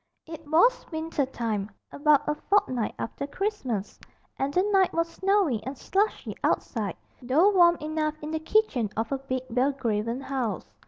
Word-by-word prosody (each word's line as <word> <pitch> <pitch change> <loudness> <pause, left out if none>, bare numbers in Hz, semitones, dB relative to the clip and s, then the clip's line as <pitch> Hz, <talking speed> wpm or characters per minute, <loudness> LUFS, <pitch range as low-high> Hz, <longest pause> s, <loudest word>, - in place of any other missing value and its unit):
It 320 -1 -10
was 475 +12 +4
winter 315 -3 -1
time, 220 -6 -3 0.2
about 295 0 +3
a 300 - +2
fortnight 260 - 0
after 280 +4 -4
Christmas, 285 - -3 0.4
and 270 +1 0
the 360 +5 +2
night 390 -2 +3
was 335 0 +1
snowy 375 - +1
and 265 +2 -6
slushy 410 - -1
outside, 210 -7 -1 0.2
though 295 +11 +4
warm 345 -3 +6
enough 305 -1 -2
in 305 - -4
the 315 - -1
kitchen 315 - +1
of 225 +3 -1
a 275 - -1
big 260 -1 -3
Belgravian 245 -2 0
house. 255 -7 -3
290 Hz, 155 wpm, -27 LUFS, 245-340 Hz, 0.4 s, warm